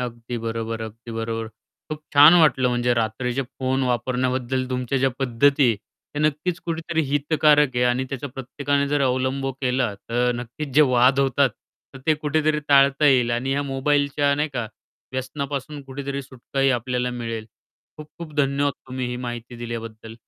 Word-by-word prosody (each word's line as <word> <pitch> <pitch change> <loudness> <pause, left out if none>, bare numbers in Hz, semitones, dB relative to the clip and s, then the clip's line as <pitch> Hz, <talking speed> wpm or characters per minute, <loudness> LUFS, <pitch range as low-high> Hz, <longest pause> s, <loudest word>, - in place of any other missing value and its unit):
अगदी 120 -1 -5
बरोबर, 115 0 -4
अगदी 115 +1 -9
बरोबर. 115 0 -3 0.4
खूप 155 - -4
छान 145 +4 +9
वाटलं 130 -4 +4
म्हणजे 120 0 +1
रात्रीचे 120 +3 -1 0.2
फोन 130 0 0
वापरण्याबद्दल 130 +1 -1
तुमच्या 125 +1 -1
ज्या 135 +1 +2
पद्धती 135 +2 +3
आहे 115 - +1 0.4
त्या 145 - -2
नक्कीच 155 +4 0
कुठेतरी 165 0 -1
हितकारक 145 -1 +3
आहे 125 - +2
आणि 125 +1 +1
त्याच्या 140 +1 -5
प्रत्येकाने 140 +2 -2
जर 145 0 +1
अवलंब 130 +1 0
केला 125 -4 0
तर 120 +4 -1
नक्कीच 125 +5 -6
जे 150 - +6
वाद 125 +3 +4
होतात 135 0 +2 0.4
तर - - -8
ते 155 - +4
कुठेतरी 150 0 0
टाळता 140 +1 +5
येईल 125 -4 +4
आणि 120 +3 -1
या 140 +1 0
मोबाईलच्या 140 +1 +1
नाही 150 +2 0
का 120 -3 -2 0.5
व्यसनापासून 140 +2 -4
कुठेतरी 140 +1 -5
सुटका 135 0 -6
ही 135 0 +4
आपल्याला 125 0 -1
मिळेल. 115 -2 -5 0.5
खूप 155 0 -9
खूप 165 -2 -8
धन्यवाद 140 0 +1
तुम्ही 130 -1 -4
ही 125 - -4
माहिती 120 -1 -6
दिल्याबद्दल. 115 -1 -7
130 Hz, 160 wpm, -23 LUFS, 120-140 Hz, 0.5 s, छान